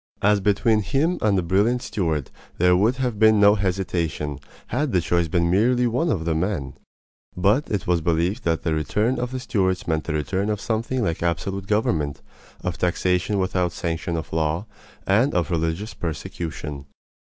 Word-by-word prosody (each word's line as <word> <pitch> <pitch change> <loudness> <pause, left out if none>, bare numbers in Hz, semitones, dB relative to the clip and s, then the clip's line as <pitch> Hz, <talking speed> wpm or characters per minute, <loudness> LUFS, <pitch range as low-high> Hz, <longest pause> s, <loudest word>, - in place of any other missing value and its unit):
As 105 0 +4
between 105 +2 +2
him 150 - 0
and 105 -2 +3
the 90 - +1
brilliant 105 +8 +2
Stuart 80 - -2 0.3
there 90 +1 +4
would 110 +7 +3
have 125 -5 -2
been 110 -1 +6
no 100 0 +7
hesitation 90 -7 -2 0.3
had 135 +2 -1
the 90 - +4
choice 85 0 +1
been 85 +1 +1
merely 120 +6 +3
one 125 +8 +1
of 80 - -1
men; 80 -3 -1 0.6
but 105 +10 +2
it 100 -5 -2
was 85 -1 +1
believed 85 +8 0
that 80 -1 0
the 80 - 0
return 105 +10 0
of 125 0 -2
the 130 0 -4
Stuarts 95 -7 0
meant 80 -2 0
the 80 - -2
return 95 +8 -1
of 105 -1 -1
something 115 +3 -1
like 85 -3 -1
absolute 95 +3 -2
government, 80 -9 0 0.4
of - - -3
taxation 90 +3 +1
without 90 -2 0
sanction 85 0 -3
of 80 - -6
law, 80 +4 0 0.4
and 110 +8 +2
of 85 -3 0
religious 85 +6 -1
persecution. 75 -3 -5
95 Hz, 170 wpm, -23 LUFS, 85-110 Hz, 0.6 s, no